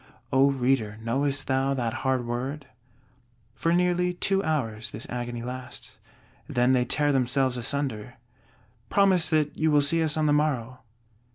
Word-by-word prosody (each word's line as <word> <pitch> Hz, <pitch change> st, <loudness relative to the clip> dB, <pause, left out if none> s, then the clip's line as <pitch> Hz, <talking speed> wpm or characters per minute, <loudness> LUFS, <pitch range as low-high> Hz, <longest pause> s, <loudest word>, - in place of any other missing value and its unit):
O 135 Hz, +1 st, +5 dB
Reader, 125 Hz, -5 st, 0 dB
knowest 140 Hz, +4 st, 0 dB
thou 135 Hz, +1 st, 0 dB
that 120 Hz, -4 st, -2 dB
hard 130 Hz, -2 st, 0 dB
word? 130 Hz, +5 st, -4 dB, 0.9 s
For 165 Hz, -, -1 dB
nearly 180 Hz, 0 st, +1 dB
two 195 Hz, +2 st, +1 dB
hours 115 Hz, -, -2 dB
this 110 Hz, -, -5 dB
agony 120 Hz, -1 st, -4 dB
lasts; 125 Hz, +1 st, -7 dB, 0.5 s
then 125 Hz, +1 st, +2 dB
they 125 Hz, -1 st, +2 dB
tear 145 Hz, +4 st, +1 dB
themselves 130 Hz, 0 st, +1 dB
asunder. 125 Hz, -2 st, -2 dB, 0.7 s
"Promise 190 Hz, -5 st, +3 dB
that 155 Hz, -2 st, +1 dB
you 160 Hz, -, +1 dB
will 150 Hz, -1 st, +4 dB
see 165 Hz, +4 st, +3 dB
us 160 Hz, -1 st, +1 dB
on 155 Hz, -, +1 dB
the 145 Hz, -, +3 dB
morrow." 130 Hz, -5 st, -1 dB
135 Hz, 150 wpm, -26 LUFS, 125-150 Hz, 0.9 s, O